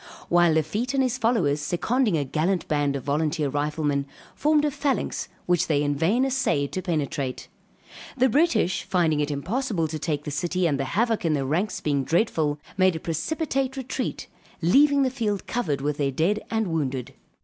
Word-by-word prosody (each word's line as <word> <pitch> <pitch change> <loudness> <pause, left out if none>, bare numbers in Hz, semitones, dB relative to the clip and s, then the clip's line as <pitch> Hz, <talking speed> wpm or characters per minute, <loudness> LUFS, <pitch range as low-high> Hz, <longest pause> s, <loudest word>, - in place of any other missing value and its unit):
While 175 -1 +4
Lafitte 210 - -1
and 270 - +3
his 255 0 -1
followers, 180 - +1
seconding 205 - +1
a 145 - -1
gallant 170 +7 0
band 145 -2 +1
of 135 - -4
volunteer 150 +1 0
riflemen, 145 0 -1 0.3
formed 300 0 +2
a 295 - +1
phalanx 280 -1 -1 0.2
which 175 -2 +2
they 145 -2 +2
in 145 0 0
vain 195 - +2
assayed 250 - 0
to 185 - -3
penetrate. 145 -7 -3 0.7
The 260 +1 +4
British 285 - +2
finding 165 -5 +1
it 145 0 0
impossible 180 - -1
to 155 0 -4
take 150 -1 -2
the 150 - -5
city 175 +4 -1
and 145 -5 +1
the 135 - 0
havoc 225 -2 +1
in 165 -2 +2
their 140 -2 0
ranks 175 +10 -1
being 140 -2 0
dreadful, 160 - +1 0.2
made 185 -2 +4
a - - -3
precipitate 265 - -2
retreat, 265 -1 -3 0.3
leaving 280 - +4
the 260 - +1
field 215 -6 -2
covered 155 - -1
with 145 +1 -1
their 140 -2 +1
dead 165 +10 +1
and 220 -1 0
wounded. 135 -6 -2
170 Hz, 180 wpm, -25 LUFS, 145-235 Hz, 0.7 s, While